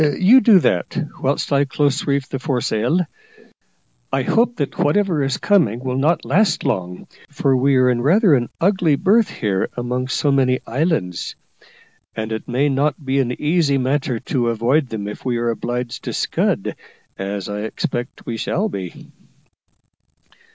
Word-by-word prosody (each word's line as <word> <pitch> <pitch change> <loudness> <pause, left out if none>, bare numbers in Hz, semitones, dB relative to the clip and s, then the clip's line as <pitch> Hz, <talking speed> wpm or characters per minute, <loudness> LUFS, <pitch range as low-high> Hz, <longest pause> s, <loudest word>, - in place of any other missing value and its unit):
You 185 - +5
do 210 -2 +6
that, - - 0 0.2
whilst 140 +1 0
I 140 0 +3
close 145 +1 0
reef 140 -1 0
the 135 - -4
foresail. 125 +2 0 1.1
I 135 - 0
hope 235 - +2
that 145 - -4
whatever 175 -1 +2
is 135 -1 0
coming 170 - +2
will 130 0 -2
not 155 +2 +1
last 165 - +2
long; 90 -6 -3 0.2
for 140 -2 +1
we 135 +2 +3
are 130 -1 +4
in 120 -1 +1
rather 180 - +4
an 120 -3 +1
ugly 180 -5 +2
berth 210 +8 +3
here 100 -3 -1
among 125 +1 -2
so 140 +3 0
many 130 -2 +2
islands, 130 - -2 0.8
and 110 0 -4
it 110 - -4
may 130 +4 +1
not 145 +2 0
be 135 +1 +1
an 125 -2 -1
easy 150 -2 +2
matter 130 -1 0
to 125 -1 -1
avoid 125 +6 +1
them 105 -2 -5
if 105 - -8
we 125 -2 -1
are 120 0 0
obliged 120 +1 -4
to - - -3
scud, - - -1 0.4
as 100 0 -4
I 105 0 -4
expect 120 +3 -4
we 115 - -4
shall 205 - -1
be." 95 - -7
135 Hz, 160 wpm, -20 LUFS, 120-150 Hz, 1.1 s, do